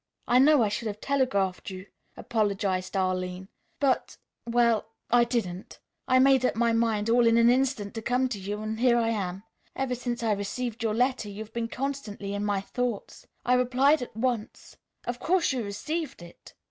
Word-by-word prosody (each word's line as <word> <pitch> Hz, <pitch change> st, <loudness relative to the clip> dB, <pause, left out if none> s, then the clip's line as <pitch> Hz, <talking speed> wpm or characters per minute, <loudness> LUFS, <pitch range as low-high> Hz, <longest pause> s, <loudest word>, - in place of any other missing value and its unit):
"I 245 Hz, -, +5 dB
know 285 Hz, -1 st, +6 dB
I -, -, +2 dB
should 220 Hz, +2 st, -3 dB
have 210 Hz, 0 st, -5 dB
telegraphed 205 Hz, -11 st, 0 dB
you," 185 Hz, 0 st, -8 dB, 0.3 s
apologized 200 Hz, -4 st, -1 dB
Arline, 185 Hz, 0 st, -2 dB, 0.3 s
"but 275 Hz, -3 st, 0 dB, 0.3 s
well 235 Hz, -2 st, +2 dB, 0.2 s
I 240 Hz, 0 st, +6 dB
didn't. 215 Hz, -7 st, -3 dB, 0.3 s
I 255 Hz, -, +4 dB
made 265 Hz, 0 st, +5 dB
up 250 Hz, -, +1 dB
my 230 Hz, 0 st, +2 dB
mind 225 Hz, -2 st, +1 dB
all 235 Hz, +1 st, +4 dB
in 230 Hz, 0 st, +4 dB
an 235 Hz, +1 st, +6 dB
instant 250 Hz, -5 st, 0 dB
to 225 Hz, -, -5 dB
come 250 Hz, +3 st, +1 dB
to 215 Hz, -5 st, -4 dB
you, 205 Hz, +2 st, -4 dB
and 220 Hz, +1 st, -4 dB
here 240 Hz, -1 st, +4 dB
I 230 Hz, -1 st, +2 dB
am. 195 Hz, -3 st, -3 dB, 0.3 s
Ever 265 Hz, -2 st, -1 dB
since 240 Hz, -1 st, -3 dB
I 225 Hz, -, +2 dB
received 215 Hz, +4 st, -3 dB
your 220 Hz, -2 st, 0 dB
letter 250 Hz, -2 st, +1 dB
you've 210 Hz, +2 st, -8 dB
been 235 Hz, -1 st, -2 dB
constantly 230 Hz, -7 st, -4 dB
in 205 Hz, 0 st, -2 dB
my 205 Hz, -2 st, 0 dB
thoughts. 245 Hz, 0 st, -4 dB, 0.2 s
I 250 Hz, -, +3 dB
replied 255 Hz, +4 st, +3 dB
at 240 Hz, -3 st, -7 dB
once. 235 Hz, -2 st, -3 dB, 0.3 s
Of 245 Hz, 0 st, -3 dB
course 350 Hz, -4 st, +2 dB
you 250 Hz, -3 st, -2 dB
received 290 Hz, -, -4 dB
it?" 170 Hz, -, -15 dB
230 Hz, 185 wpm, -27 LUFS, 205-250 Hz, 0.3 s, know